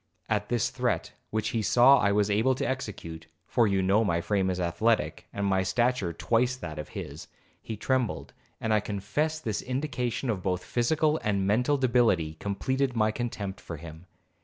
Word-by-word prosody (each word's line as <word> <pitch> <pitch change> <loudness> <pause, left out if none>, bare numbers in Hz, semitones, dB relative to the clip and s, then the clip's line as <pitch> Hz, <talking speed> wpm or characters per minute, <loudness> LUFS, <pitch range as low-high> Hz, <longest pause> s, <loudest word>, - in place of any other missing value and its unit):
At 105 -1 -1
this 120 -3 +1
threat, - - -1 0.2
which 110 0 -1
he 115 - -1
saw 125 +6 +6
I 100 - +3
was 105 0 +2
able 115 +6 +3
to - - -2
execute, 90 -11 -5 0.2
(for 120 -3 +2
you 95 -1 +1
know 100 +4 +3
my 85 -6 +1
frame 95 +2 0
is 90 0 -2
athletic, 90 +7 0
and 100 - -2
my 95 -1 +2
stature 120 -1 +1
twice 120 +8 +1
that 75 -11 -7
of 75 - -6
his), - - -7 0.3
he 110 - -6
trembled; 130 +1 -1 0.3
and 110 -1 0
I 105 - +4
confess 105 +11 -2
this 110 -8 -2
indication 125 -2 -2
of 95 -4 -3
both 90 0 -1
physical 155 +6 +1
and 100 -2 +1
mental 125 +8 +2
debility 115 - +2
completed 130 +6 -1
my 110 -1 +3
contempt 105 -4 -4
for 85 - -7
him. 80 +2 -11
110 Hz, 180 wpm, -28 LUFS, 95-125 Hz, 0.3 s, saw